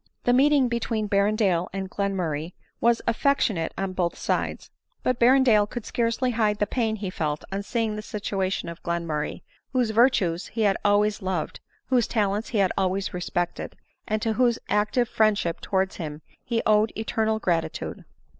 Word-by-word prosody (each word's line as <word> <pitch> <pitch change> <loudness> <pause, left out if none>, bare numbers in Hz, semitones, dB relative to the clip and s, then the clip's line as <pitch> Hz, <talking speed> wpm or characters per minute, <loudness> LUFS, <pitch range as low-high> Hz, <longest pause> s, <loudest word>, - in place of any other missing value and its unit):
The 245 - +3
meeting 275 0 +4
between 230 -2 -1
Berrendale 200 -3 +2
and 195 0 -4
Glenmurray 180 -5 -2 0.3
was 235 0 +2
affectionate 230 - +1
on 195 -1 -2
both 175 -2 -1
sides; - - -2 0.3
but 255 -1 0
Berrendale 240 -4 +5
could 240 -3 -6
scarcely 235 +2 0
hide 215 -3 +1
the 210 - +1
pain 225 -1 -1
he 200 -3 -4
felt 150 -4 -2
on 195 +1 -2
seeing 220 0 -1
the 215 - -4
situation 195 -3 -2
of 170 0 -8
Glenmurray, 170 -3 -3 0.3
whose 245 -4 +2
virtues 210 -7 +2
he 225 - -4
had 200 -2 +3
always 205 +1 +2
loved, 185 -4 -3 0.3
whose 250 -3 +3
talents 210 -1 0
he 230 - -2
had 195 -2 +3
always 190 0 -1
respected, 175 0 -3 0.3
and 215 0 -1
to 225 -2 +1
whose 240 0 +2
active 215 +4 +2
friendship 210 -7 +1
towards 190 -1 -1
him 150 -2 -6 0.2
he 235 -3 -1
owed 215 0 +4
eternal 220 0 0
gratitude. 170 -6 -2
210 Hz, 160 wpm, -25 LUFS, 185-230 Hz, 0.3 s, Berrendale